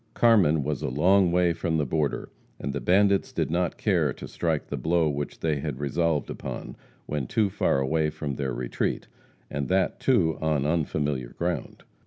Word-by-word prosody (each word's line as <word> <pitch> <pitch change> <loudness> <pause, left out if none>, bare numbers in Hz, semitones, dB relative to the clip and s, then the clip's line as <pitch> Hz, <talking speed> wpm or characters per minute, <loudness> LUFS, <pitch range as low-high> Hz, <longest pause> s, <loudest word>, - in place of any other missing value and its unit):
Carmen 95 -11 +4
was 75 -2 -2
a - - -1
long 90 +7 +4
way 90 -1 +3
from 80 -1 -1
the 75 - +1
border, 75 +1 -1 0.3
and 70 +1 -3
the 70 - -3
bandits 100 +2 +3
did - - -1
not 90 0 0
care - - +2
to - - -8
strike 80 -3 -1
the - - -4
blow 85 0 +1
which 75 -1 -4
they 75 -3 0
had - - -4
resolved 75 +2 0
upon - - -6 0.3
when 75 -4 -3
too 105 - +1
far - - +1
away 75 +3 +1
from 75 -2 -4
their 65 -1 -2
retreat, - - -2 0.4
and 70 -1 -2
that, 95 0 +1
too, 90 -12 +2
on 75 -3 +1
unfamiliar 75 -5 -1
ground. 85 0 -3
80 Hz, 180 wpm, -26 LUFS, 70-85 Hz, 0.4 s, Carmen